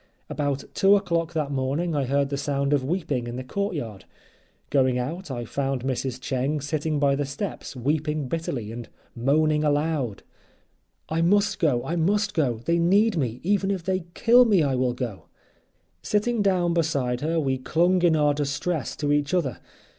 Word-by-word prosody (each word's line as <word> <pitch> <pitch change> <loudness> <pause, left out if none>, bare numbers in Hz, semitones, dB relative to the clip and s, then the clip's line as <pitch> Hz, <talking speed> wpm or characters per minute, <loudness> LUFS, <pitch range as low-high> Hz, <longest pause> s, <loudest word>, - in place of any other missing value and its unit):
About 140 -2 -1
2 195 +1 +5
o'clock 170 -4 0
that 150 -3 -1
morning 140 +5 -1
I 140 -2 +1
heard 140 +2 +1
the 140 - -2
sound 140 0 0
of 140 -3 +2
weeping 145 -5 -2
in 120 - -5
the 130 - -5
courtyard; 145 - -4 0.7
going 130 -2 +3
out 155 +8 -4
I 120 -3 -4
found 135 +1 -2
Mrs. 130 -1 -2
Cheng 135 +3 -1
sitting 150 +1 -2
by 140 -1 +3
the 145 - -1
steps 145 +3 -5
weeping 150 +2 -1
bitterly, 130 -8 -3
and 120 0 -8 0.3
moaning 150 +5 +2
aloud: 145 -6 0 0.8
"I 160 +1 -1
must 200 +3 +2
go, 130 -7 +1
I 170 - -2
must 205 +5 +1
go; 125 -9 0
they 170 0 +2
need 200 +5 +3
me, 125 -6 -2
even 195 +1 +1
if 190 -3 -2
they 185 -1 -1
kill 240 +2 +6
me 200 -8 +4
I 140 -2 +1
will 125 -1 +1
go." 120 -6 -5 0.8
Sitting 215 +2 0
down 180 -4 +2
beside 140 -7 0
her 165 +2 0
we 135 -3 0
clung 175 +7 +2
in 170 -2 +4
our 150 -1 +3
distress 145 0 -2
to 145 -1 -1
each 145 +3 +1
other. 140 - -1
150 Hz, 175 wpm, -25 LUFS, 130-170 Hz, 0.8 s, kill